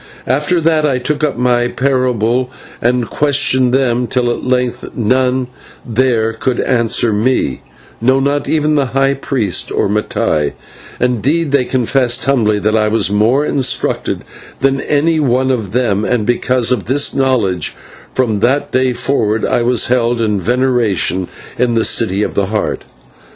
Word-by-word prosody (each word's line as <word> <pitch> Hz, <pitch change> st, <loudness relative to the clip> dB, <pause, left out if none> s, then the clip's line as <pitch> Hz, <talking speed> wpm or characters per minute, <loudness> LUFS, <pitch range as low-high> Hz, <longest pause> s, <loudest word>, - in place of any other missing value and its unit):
After 150 Hz, +6 st, +1 dB
that 160 Hz, -1 st, +1 dB
I 140 Hz, -4 st, +1 dB
took 145 Hz, +4 st, -2 dB
up 145 Hz, -4 st, 0 dB
my 120 Hz, 0 st, +1 dB
parable 125 Hz, -2 st, 0 dB, 0.3 s
and 120 Hz, 0 st, +1 dB
questioned 140 Hz, -3 st, +2 dB
them 125 Hz, -2 st, +1 dB
till 120 Hz, +1 st, 0 dB
at -, -, -4 dB
length 125 Hz, -1 st, -1 dB
none 130 Hz, +2 st, +1 dB, 0.4 s
there 115 Hz, -1 st, +1 dB
could 125 Hz, +2 st, -2 dB
answer 115 Hz, -2 st, +1 dB
me 105 Hz, -, 0 dB, 0.4 s
no, 130 Hz, +3 st, +3 dB
not 140 Hz, +1 st, -1 dB
even 155 Hz, -1 st, +1 dB
the 135 Hz, -4 st, -1 dB
high 135 Hz, 0 st, +3 dB
priest 125 Hz, -, -2 dB
or -, -, 0 dB
Mattai; 95 Hz, -7 st, -1 dB, 0.5 s
and 125 Hz, -3 st, 0 dB
they 140 Hz, 0 st, +1 dB
confessed 125 Hz, -1 st, 0 dB
humbly 115 Hz, -6 st, +2 dB
that 110 Hz, +1 st, 0 dB
I 110 Hz, -1 st, +2 dB
was 105 Hz, -2 st, +1 dB
more 115 Hz, +8 st, +2 dB
instructed 135 Hz, -4 st, -1 dB, 0.4 s
than 135 Hz, 0 st, +1 dB
any 155 Hz, +2 st, +1 dB
one 130 Hz, -2 st, +1 dB
of 110 Hz, -7 st, -3 dB
them, 110 Hz, -4 st, 0 dB
and 110 Hz, -1 st, 0 dB
because 120 Hz, +1 st, +1 dB
of 115 Hz, -7 st, 0 dB
this 140 Hz, +4 st, +1 dB
knowledge 115 Hz, -, 0 dB, 0.4 s
from 115 Hz, -5 st, 0 dB
that 130 Hz, +6 st, +1 dB
day 130 Hz, 0 st, +1 dB
forward 115 Hz, -4 st, 0 dB
I 120 Hz, -, +1 dB
was 120 Hz, -1 st, +1 dB
held 120 Hz, -1 st, +1 dB
in 105 Hz, -3 st, 0 dB
veneration 115 Hz, -5 st, 0 dB, 0.3 s
in 120 Hz, -1 st, +1 dB
the 115 Hz, -, +2 dB
City 105 Hz, -3 st, +1 dB
of -, -, -3 dB
the 100 Hz, -2 st, 0 dB
Heart. 105 Hz, +1 st, -2 dB
125 Hz, 155 wpm, -15 LUFS, 115-135 Hz, 0.5 s, no